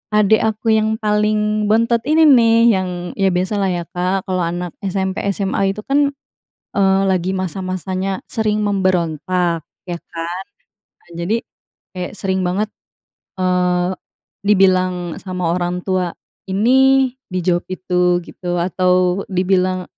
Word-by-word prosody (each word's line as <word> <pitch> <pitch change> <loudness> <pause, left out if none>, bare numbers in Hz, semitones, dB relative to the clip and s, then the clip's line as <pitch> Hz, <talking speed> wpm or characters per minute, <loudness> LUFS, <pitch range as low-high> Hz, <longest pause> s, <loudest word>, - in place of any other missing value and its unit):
Adik 210 +1 +4
aku 220 0 +1
yang 220 0 0
paling 210 0 +1
bontot 230 +2 +3
ini 320 +1 +4
nih, 230 -4 +6 0.2
yang 185 -1 -3 0.3
ya 195 - +3
biasalah 190 +2 0
ya, 175 -1 -2
Kak, 185 +2 -1
kalau 185 -1 0
anak 175 0 -4
SMP, 190 0 -2
SMA 195 0 0
itu 210 - -6
kan, 285 +1 +2 0.7
eee, 195 0 +3
lagi 185 0 0
masa-masanya 185 +1 -3
sering 215 -1 0
memberontak, 180 -3 0 0.3
ya 175 - -2
kan. 170 +2 -6 0.6
Nah, 175 - -25
jadi, 180 +6 0 0.6
kayak 180 +1 -5
sering 190 -1 -1
banget, 200 +4 -1 0.7
eee, 180 0 +1 0.5
dibilang 185 -3 +2
sama 180 -3 -2
orang 180 0 -2
tua 185 -2 0 0.4
ini, 260 +6 +4 0.2
dijawab 180 -1 0
itu, 180 -1 +1
gitu. 175 -1 -5
Atau 180 +1 +1
dibilang, 185 0 +1
185 Hz, 125 wpm, -18 LUFS, 180-210 Hz, 0.7 s, nih